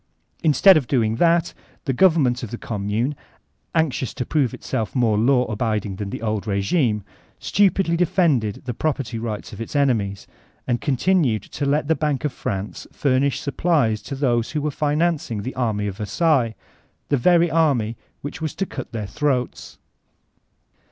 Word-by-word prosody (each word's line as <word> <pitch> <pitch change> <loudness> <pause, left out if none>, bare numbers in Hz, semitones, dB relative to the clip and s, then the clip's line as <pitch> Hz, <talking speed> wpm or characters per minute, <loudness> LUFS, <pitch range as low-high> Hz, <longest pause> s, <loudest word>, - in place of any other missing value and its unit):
Instead 170 +3 +6
of 135 -6 -1
dcnng 115 -4 +1
that, 170 0 +3 0.3
the 135 - 0
government 140 -6 +3
of 120 - -5
the 120 - -5
Conunune, 110 +6 -2 0.6
anxious 145 -6 0
to 125 - -3
prove 140 -6 +1
itself 110 +3 -4
more 115 -4 +3
law 125 +4 +3
abiding 105 -3 -2
than 100 -1 -4
the 105 - -6
old 110 -3 -1
rq^ime, 105 - +1 0.3
stupidly 195 -3 +2
defended 160 - +1
the 125 - -3
property 130 -4 -2
right 110 -2 -5
of - - -8
its 115 - -6
enemies, 110 -9 +1 0.4
and 120 -2 -1
continued 140 - +1
to 140 - -4
let 145 +1 +1
the 160 - +4
Bank 150 -3 -1
of 150 - -1
France 100 -4 -4
furnish 140 0 +1
supplies 140 -7 +1
to 140 - -6
those 120 -4 +1
who 150 - -1
were 150 - 0
financing 150 -7 0
the 130 - -4
army 110 -5 -1
of 100 -2 -4
Versailles, 120 - +1 0.5
the 145 - +3
veiy 170 +5 +3
army 135 -9 +2 0.3
which 145 +3 -6
was 155 -2 -3
to 195 - -1
cut 130 -8 -7
their 110 -2 -3
throats. 130 +3 -2
130 Hz, 160 wpm, -22 LUFS, 110-155 Hz, 0.6 s, Instead